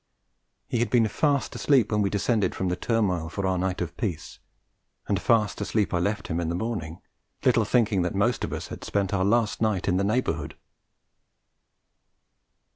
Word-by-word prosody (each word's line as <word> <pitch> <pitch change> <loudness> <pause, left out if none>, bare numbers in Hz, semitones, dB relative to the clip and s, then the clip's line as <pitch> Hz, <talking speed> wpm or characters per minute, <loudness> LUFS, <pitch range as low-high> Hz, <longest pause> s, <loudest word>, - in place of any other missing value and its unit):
He 120 - -1
had 120 - +1
been 115 -3 +4
fast 140 +4 0
asleep 130 -7 +2
when 105 -1 +2
we 100 - +1
descended 105 +1 0
from 95 - -1
the 90 - 0
turmoil 95 -7 0
for 100 +3 -3
our 95 -1 +1
night 95 0 -1
of 85 -1 -4
peace; 90 -9 -4 0.7
and 100 -1 0
fast 110 -4 +2
asleep 105 -4 0
I 90 - +2
left 100 +3 -1
him 80 - -2
in 85 -2 -1
the 85 - -1
morning, 90 -6 -4 0.4
little - - +4
thinking 110 -6 +2
that 90 +2 -2
most 105 +4 +1
of - - -3
us - - -5
had - - -8
spent 100 -2 -1
our 95 -2 +1
last 110 +2 +1
night 105 -5 0
in 90 -1 +2
the 100 - +1
neighbourhood. 85 -9 -1
100 Hz, 185 wpm, -26 LUFS, 90-115 Hz, 0.7 s, been